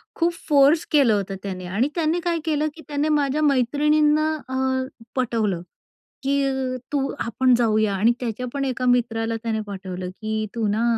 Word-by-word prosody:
खूप 340 Hz, 0 st, +1 dB
फोर्स 290 Hz, +2 st, +5 dB
केलं 280 Hz, -7 st, +5 dB
होतं 195 Hz, -1 st, -1 dB
त्याने 185 Hz, -2 st, -5 dB
आणि 205 Hz, +9 st, 0 dB
त्याने 330 Hz, +1 st, +1 dB
काय 340 Hz, -1 st, 0 dB
केलं 305 Hz, -1 st, +1 dB
की 325 Hz, -, -11 dB
त्याने 295 Hz, +1 st, -1 dB
माझ्या 295 Hz, -1 st, +1 dB
मैत्रिणींना 300 Hz, +3 st, +3 dB, 0.2 s
अ, 260 Hz, -, -2 dB, 0.6 s
पटवलं 220 Hz, -8 st, 0 dB, 0.6 s
की 270 Hz, -2 st, 0 dB, 0.2 s
तू 275 Hz, -1 st, +1 dB
आपण 250 Hz, +2 st, +2 dB
जाऊया 215 Hz, -3 st, +2 dB
आणि 220 Hz, +5 st, +4 dB
त्याच्या 245 Hz, 0 st, -3 dB
पण 275 Hz, -1 st, -1 dB
एका 255 Hz, -1 st, -2 dB
मित्राला 230 Hz, -2 st, +1 dB
त्याने 220 Hz, -1 st, -1 dB
पाठवलं 185 Hz, -2 st, -6 dB
की 215 Hz, +3 st, -3 dB
तू 225 Hz, -2 st, 0 dB
ना 215 Hz, +3 st, 0 dB
255 Hz, 160 wpm, -23 LUFS, 220-290 Hz, 0.6 s, फोर्स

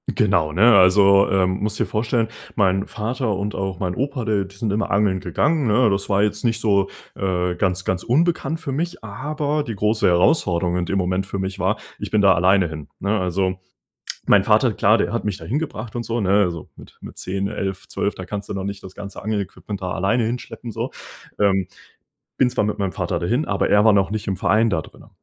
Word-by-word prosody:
Genau, 85 Hz, -7 st, +2 dB
ne? 115 Hz, +5 st, +6 dB
Also, 100 Hz, +1 st, +6 dB
ähm, 95 Hz, 0 st, +1 dB
musst 105 Hz, 0 st, -2 dB
dir -, -, +2 dB
vorstellen, 115 Hz, +1 st, 0 dB, 0.3 s
mein 95 Hz, -2 st, +2 dB
Vater 115 Hz, 0 st, -2 dB
und 100 Hz, +2 st, -3 dB
auch 95 Hz, -2 st, -3 dB
mein 90 Hz, -1 st, -1 dB
Opa, 135 Hz, +1 st, -2 dB
äh, 105 Hz, -3 st, 0 dB
die 100 Hz, +1 st, -15 dB
sind 105 Hz, 0 st, -2 dB
immer 105 Hz, 0 st, -1 dB
angeln 100 Hz, -1 st, +2 dB
gegangen, 135 Hz, -, 0 dB
ne? 110 Hz, +1 st, +4 dB
Das 100 Hz, 0 st, -1 dB
war 100 Hz, 0 st, +2 dB
jetzt 105 Hz, +3 st, -1 dB
nicht 115 Hz, -1 st, 0 dB
so, 100 Hz, -3 st, +2 dB, 0.3 s
äh, 90 Hz, -2 st, -1 dB
ganz 95 Hz, -2 st, 0 dB
ganz 95 Hz, -1 st, -2 dB
unbekannt 160 Hz, +3 st, +1 dB
für 140 Hz, -, -4 dB
mich. 165 Hz, -1 st, -3 dB
Aber 145 Hz, +7 st, -2 dB
die 115 Hz, -5 st, -5 dB
große 105 Hz, +1 st, +1 dB
Herausforderung 90 Hz, -, +2 dB
in 90 Hz, -, -1 dB
dem 95 Hz, -, -1 dB
Moment 95 Hz, +1 st, 0 dB
für 100 Hz, 0 st, -5 dB
mich 95 Hz, 0 st, -4 dB
war, -, -, +1 dB, 0.2 s
ich -, -, -5 dB
bin 105 Hz, -1 st, +2 dB
da 95 Hz, -2 st, +6 dB
alleine 90 Hz, +1 st, +3 dB
hin, 75 Hz, -2 st, -8 dB
ne? 105 Hz, +2 st, 0 dB
Also, 95 Hz, +1 st, -1 dB, 0.7 s
mein -, -, +5 dB
Vater -, -, +3 dB
klar, -, -, +4 dB
der -, -, -1 dB
hat -, -, -1 dB
mich 105 Hz, -3 st, -2 dB
da -, -, -11 dB
hingebracht 120 Hz, -4 st, -4 dB
und 120 Hz, -, -2 dB
so, 115 Hz, +1 st, -2 dB
ne? 95 Hz, -3 st, 0 dB
Also 85 Hz, -3 st, -4 dB
mit -, -, -15 dB
mit -, -, -11 dB
10, 95 Hz, +1 st, -3 dB
11, 95 Hz, -1 st, -4 dB
12, -, -, -2 dB
da -, -, -7 dB
kannst 100 Hz, -1 st, -6 dB
du -, -, -3 dB
noch 95 Hz, -1 st, -4 dB
nicht 100 Hz, 0 st, -6 dB
das 95 Hz, -, -10 dB
ganze 100 Hz, -1 st, -8 dB
Angel-Equipment 100 Hz, -1 st, -4 dB
da 90 Hz, -, -3 dB
alleine 100 Hz, +6 st, +1 dB
hinschleppen, 115 Hz, 0 st, -5 dB
so, -, -, -4 dB, 0.5 s
ähm. 95 Hz, -2 st, +2 dB, 0.7 s
Bin 125 Hz, -, +4 dB
zwar 120 Hz, -, 0 dB
mit 105 Hz, -, -2 dB
meinem 100 Hz, -2 st, -1 dB
Vater 85 Hz, -2 st, -2 dB
dahin, 120 Hz, -, 0 dB
aber 100 Hz, -, 0 dB
er 105 Hz, 0 st, +5 dB
war 110 Hz, -, +6 dB
noch 95 Hz, -1 st, +2 dB
nicht 110 Hz, 0 st, -3 dB
im 95 Hz, -, -1 dB
Verein 110 Hz, +5 st, +2 dB
da 80 Hz, -6 st, 0 dB
drinnen. -, -, -16 dB
100 Hz, 220 wpm, -21 LUFS, 95-115 Hz, 0.7 s, ne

